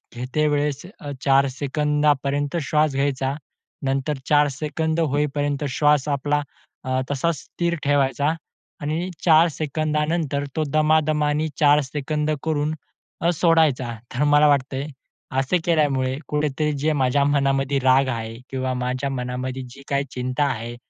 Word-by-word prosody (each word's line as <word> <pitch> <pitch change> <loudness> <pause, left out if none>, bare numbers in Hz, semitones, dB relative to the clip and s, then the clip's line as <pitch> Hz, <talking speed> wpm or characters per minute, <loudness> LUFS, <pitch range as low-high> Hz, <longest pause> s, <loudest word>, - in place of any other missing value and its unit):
घेते 130 +5 -1
वेळेस 145 +1 -1
अ, 145 - -6
4 140 0 +4
सेकंदापर्यंत 145 +1 0
श्वास 150 0 +2
घ्यायचा, 135 -1 0 0.5
नंतर 135 +2 -1
4 150 0 +5
सेकंद 160 +2 -1
होईपर्यंत 145 -1 0
श्वास 145 +1 +2
आपला 145 +1 0 0.4
अ, 130 0 0
तसाच 155 +4 0
स्थिर 170 0 -2
ठेवायचा 145 +1 +2 0.5
आणि 160 +5 -2 0.2
4 165 0 +6
सेकंदानंतर 150 0 -1
तो 155 - +1
दमादमाने 155 0 +2
4 150 -1 +5
सेकंद 150 +2 -2
करून 155 -1 0 0.5
अ, 170 - +3
सोडायचा. 155 -8 +2 0.2
तर 130 +4 0
मला 145 0 +5
वाटतंय 140 0 +1 0.5
असे 135 +7 +1
केल्यामुळे 135 -6 +1
कुठेतरी 150 0 0
जे 155 +2 +1
माझ्या 140 0 +2
मनामध्ये 140 -1 +1
राग 130 +1 +4
आहे 115 -1 -4 0.2
किंवा 130 -1 -2
माझ्या 125 +2 -2
मनामध्ये 125 0 -4
जी 135 +3 -13
काही 140 0 +1
चिंता 125 +2 -1
आहे 120 -3 -3
145 Hz, 130 wpm, -23 LUFS, 135-150 Hz, 0.5 s, 4